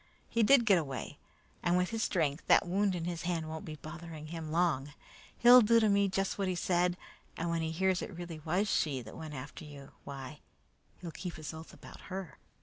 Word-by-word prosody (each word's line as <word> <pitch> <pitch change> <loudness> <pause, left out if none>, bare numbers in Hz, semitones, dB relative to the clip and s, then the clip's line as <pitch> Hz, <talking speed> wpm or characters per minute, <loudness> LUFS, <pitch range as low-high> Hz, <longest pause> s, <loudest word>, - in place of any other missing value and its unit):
He 230 - 0
did 240 +2 +6
get 195 -5 +5
away, 135 -5 -6 0.4
and 175 0 +2
with 180 +2 0
his 225 -1 -2
strength, 155 -7 0
that - - +5
wound 195 +1 +1
in 170 -2 -3
his 175 -1 -3
hand 170 -2 -2
won't 160 0 -6
be 155 - -6
bothering 155 0 -9
him 160 -2 -6
long. 155 -5 +1 0.4
He'll 245 +1 +9
do 230 +1 +5
to 220 -2 +3
me 200 0 +3
just 195 +1 -1
what 195 - 0
he 185 - 0
said, 175 0 +1 0.4
and 170 0 -2
when 165 -1 0
he 160 - -1
hears 185 +3 +1
it 185 - -7
really 170 -2 -6
was 175 +7 0
she 140 - 0
that 110 - -11
went 155 -2 -7
after 135 +4 -8
you, 145 -2 -11
why, 140 +1 -8 0.6
he'll 170 -2 -6
keep 175 0 -6
his 155 0 -7
oath 160 +1 -10
about - - -13
her. 185 -7 -6
170 Hz, 215 wpm, -32 LUFS, 155-190 Hz, 0.6 s, He'll